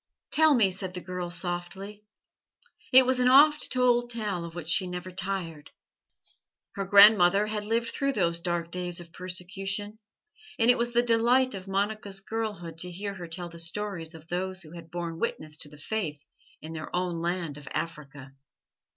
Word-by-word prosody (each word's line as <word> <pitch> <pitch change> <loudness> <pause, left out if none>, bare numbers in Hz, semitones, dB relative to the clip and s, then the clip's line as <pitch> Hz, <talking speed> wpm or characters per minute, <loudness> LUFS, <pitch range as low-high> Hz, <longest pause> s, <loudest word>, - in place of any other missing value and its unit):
"Tell 315 -2 +5
me," 210 -6 +4
said 185 0 -4
the - - -3
girl 180 -1 -5
softly. 180 +4 -4 0.9
It 260 0 +8
was 260 0 +2
an 250 - +3
oft 295 +4 +6
told 245 -1 +3
tale 210 -7 -2
of 170 0 -8
which 170 -3 -6
she 180 +3 +2
never 180 +1 -6
tired. 175 -5 -4 1.0
Her 195 - -4
grandmother 200 -1 +7
had 210 -1 -3
lived 230 +2 0
through 275 -1 -1
those 170 -6 +1
dark 170 -1 -2
days 180 -1 -3
of 170 -1 -12
persecution, 195 +4 -3 0.6
and 230 +1 +6
it 245 - +1
was 240 0 0
the 240 0 +4
delight 245 +2 +3
of 190 -1 -7
Monica's 200 0 -2
girlhood 195 -6 -5
to 180 - -3
hear 200 +3 -5
her 180 -3 -8
tell 175 +1 -6
the 170 0 -10
stories 170 -1 -3
of 160 0 -13
those 185 +2 -3
who 155 - -14
had 165 -1 -11
borne 170 -1 -5
witness 155 -9 -3
to 150 - -4
the 150 - -14
Faith 150 -4 -3 0.4
in 160 +1 -7
their 155 -1 -6
own 180 -2 -1
land 170 -4 -2
of 145 - -14
Africa. 140 -4 -6
185 Hz, 175 wpm, -28 LUFS, 170-215 Hz, 1.0 s, It